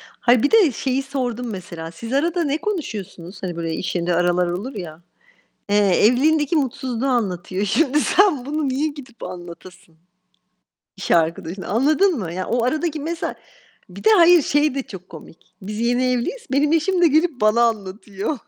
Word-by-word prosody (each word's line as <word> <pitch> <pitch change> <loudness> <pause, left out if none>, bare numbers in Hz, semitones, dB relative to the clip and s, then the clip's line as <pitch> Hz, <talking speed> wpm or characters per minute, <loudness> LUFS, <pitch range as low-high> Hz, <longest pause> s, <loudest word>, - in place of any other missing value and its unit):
Hayır 240 0 +1
bir 285 - +2
de 405 -11 +5
şeyi 260 +3 -1
sordum 250 -3 -3
mesela: 170 -4 -7
"Siz 230 +9 -8
arada 335 +4 +1
ne 290 +1 0
konuşuyorsunuz?" 210 - -5
Hani, 175 -2 -4
böyle 165 -1 -3
iş 185 - -4
yerinde 175 0 0
aralar 175 +1 +2
olur 205 +9 -4
ya. 170 -4 -8 0.7
Eee, 205 - +2 0.3
evliliğindeki 295 +6 +3
mutsuzluğu 260 -3 -2
anlatıyor. 195 -5 -1
Şimdi 295 +6 +2
sen 360 -11 +3
bunu 295 -1 -2
niye 280 +4 0
gidip 275 -6 -10
anlatasın 175 -1 -10 1.0
iş 195 - -7
arkadaşına, 170 +2 0
anladın 305 - +2
mı? 175 -6 -5
Ya, 185 +1 -4
o 240 -1 0
aradaki 310 +4 -1
mesa 330 +3 -4 0.5
bir - - -12
de 440 - +6
hayır, 345 -2 +6
şey 290 0 +1
de 275 - -2
çok 190 -6 -11
komik. 165 0 -13 0.2
Biz 210 +3 -5
yeni 245 +2 +1
evliyiz. 465 - -3
Benim 290 +2 +2
eşim 350 +3 +1
de - - +7
gelip 315 -2 +1
bana 215 +3 +3
anlatıyor. 210 +2 -2
245 Hz, 165 wpm, -21 LUFS, 185-300 Hz, 1.0 s, de